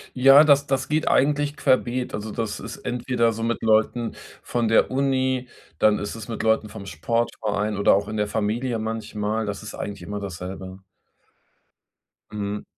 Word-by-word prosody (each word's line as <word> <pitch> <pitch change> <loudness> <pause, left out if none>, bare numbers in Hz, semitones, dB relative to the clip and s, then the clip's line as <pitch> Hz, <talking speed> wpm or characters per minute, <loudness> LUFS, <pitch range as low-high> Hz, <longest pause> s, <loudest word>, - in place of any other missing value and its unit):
Ja, 135 +3 +8
das 140 -2 +4
das 135 +1 -1
geht 155 +1 0
eigentlich 145 +1 +2
querbeet. 125 -1 +1
Also 105 +1 -4
das 110 -2 -3
ist - - -7
entweder 120 -1 0
so 115 - -6
mit 115 0 -1
Leuten 110 +1 +2 0.3
von 120 -2 -1
der 115 - +3
Uni, 130 -1 0 0.3
dann 105 -1 +4
ist 105 - -4
es 110 -2 -8
mit 115 - -4
Leuten 110 -1 +2
vom 100 -1 -9
Sportverein 105 +2 -1
oder 100 - +5
auch 100 +1 -1
in 110 0 -4
der 105 0 0
Familie 115 +3 -1
manchmal. 110 -1 -3
Das 100 0 -4
ist 105 - -8
eigentlich 100 -1 -6
immer 105 0 -5
dasselbe. 95 0 -7 1.5
Mhm. 105 0 -4
110 Hz, 165 wpm, -24 LUFS, 105-125 Hz, 1.5 s, Ja